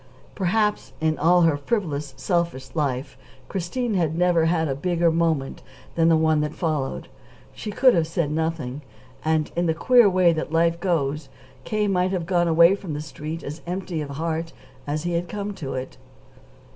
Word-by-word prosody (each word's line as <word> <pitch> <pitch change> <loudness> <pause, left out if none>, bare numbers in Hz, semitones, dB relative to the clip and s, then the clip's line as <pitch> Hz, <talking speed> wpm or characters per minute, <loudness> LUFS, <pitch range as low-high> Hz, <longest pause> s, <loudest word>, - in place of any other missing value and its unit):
Perhaps, 210 +3 0
in 160 0 0
all 175 +2 +4
her 165 -3 +4
frivolous, 145 - -2
selfish 170 -6 -2
life, 140 -4 -2 0.3
Christine 215 +6 -2
had 165 -4 0
never 175 -2 +3
had 160 -1 +1
a 135 - -1
bigger 170 +3 +1
moment 160 -4 0 0.3
than 165 0 +3
the 165 - +5
one 160 -1 +2
that 150 0 -3
followed. 155 -6 -2 0.5
She 215 - -7
could 255 +4 +4
have 165 -2 +1
said 165 -3 -1
nothing, 155 -4 -2 0.4
and, 155 -1 0
in 175 0 +1
the 160 - +1
queer 240 +5 +5
way 180 -2 +4
that 160 -1 -4
life 165 +1 +2
goes, 150 -5 -1 0.4
K. 215 -1 0
might 185 -2 +1
have 175 -3 -2
gone 175 -1 +2
away 170 +2 +6
from 190 -6 -5
the - - -3
Street 155 +2 -7
as 150 +4 -7
empty 180 -2 -3
of 145 - -5
heart 160 +3 -3 0.3
as 150 +2 -2
he 175 - -2
had 170 0 -2
come 205 +2 -4
to 140 -9 -6
it. 130 0 -6
165 Hz, 180 wpm, -24 LUFS, 155-180 Hz, 0.5 s, away